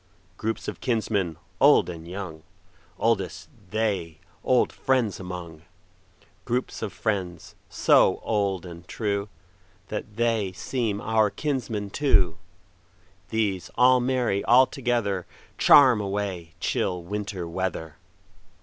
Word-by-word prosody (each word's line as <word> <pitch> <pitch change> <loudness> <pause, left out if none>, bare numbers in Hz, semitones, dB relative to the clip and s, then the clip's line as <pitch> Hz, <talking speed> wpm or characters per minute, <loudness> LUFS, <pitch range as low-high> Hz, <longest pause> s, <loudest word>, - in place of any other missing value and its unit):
Groups 110 +3 -3
of - - -5
kinsmen, 105 - 0 0.2
old 145 +1 +6
and 85 -2 -8
young, 90 -4 -6 0.6
Oldest 100 -7 -1 0.2
they 100 -7 -1 0.3
old 125 -1 +2
friends 125 -6 0
among; 90 -4 -7 0.8
Groups 125 +3 -2
of 105 - -3
friends, 90 -7 -3 0.2
so - - +4
old 100 -4 0
and 85 -1 -10
trueThat 100 -3 -5
they 115 -5 0
seem 105 +2 -2
our 110 -1 +2
kinsmen 115 -8 -3
too; 95 - +2 0.9
These 105 -5 -1
all 125 0 +6
merry 125 -5 0
all 125 +2 +7
togetherCharm 120 - +3
away 95 -5 -4
chill 90 -2 -1
Winter 100 -1 -4
weather. 85 -3 -4
100 Hz, 105 wpm, -25 LUFS, 90-115 Hz, 0.9 s, all